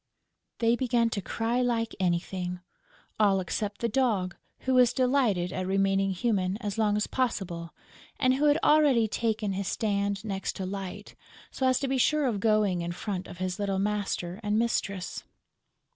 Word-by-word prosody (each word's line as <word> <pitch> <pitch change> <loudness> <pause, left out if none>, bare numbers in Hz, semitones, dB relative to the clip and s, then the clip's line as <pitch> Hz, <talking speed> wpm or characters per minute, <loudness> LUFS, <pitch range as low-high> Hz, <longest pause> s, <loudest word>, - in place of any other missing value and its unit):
They 230 0 +3
began 240 -2 +1
to 200 - -2
cry 230 +5 -1
like 230 -2 0
anything, 180 0 -1 0.6
all 200 -3 +4
except 200 +3 -3
the 235 - +2
Dog, 215 -7 0 0.3
who 260 - 0
was 250 -1 +5
delighted 245 -9 +1
at 185 0 -3
remaining 195 0 +2
human 190 -1 0
as 210 -2 -4
long 210 -1 +2
as 210 - +1
possible 180 -10 -2 0.4
and 255 0 +4
who 280 +3 +1
had 295 0 +5
already 290 -7 +5
taken 220 -2 -1
his 195 0 -3
stand 200 -1 -1
next 195 -2 -3
to 190 - -4
Light, 195 +1 -6 0.4
so 260 - 0
as 255 -1 +3
to 275 - 0
be 265 0 0
sure 300 +3 +3
of 225 -6 0
going 210 -4 +2
in 170 0 -3
front 185 0 -4
of - - -10
his 185 +1 -3
little 200 -1 0
master 200 -2 -2
and 210 0 0
mistress. 200 -5 -1
205 Hz, 170 wpm, -28 LUFS, 190-235 Hz, 0.6 s, was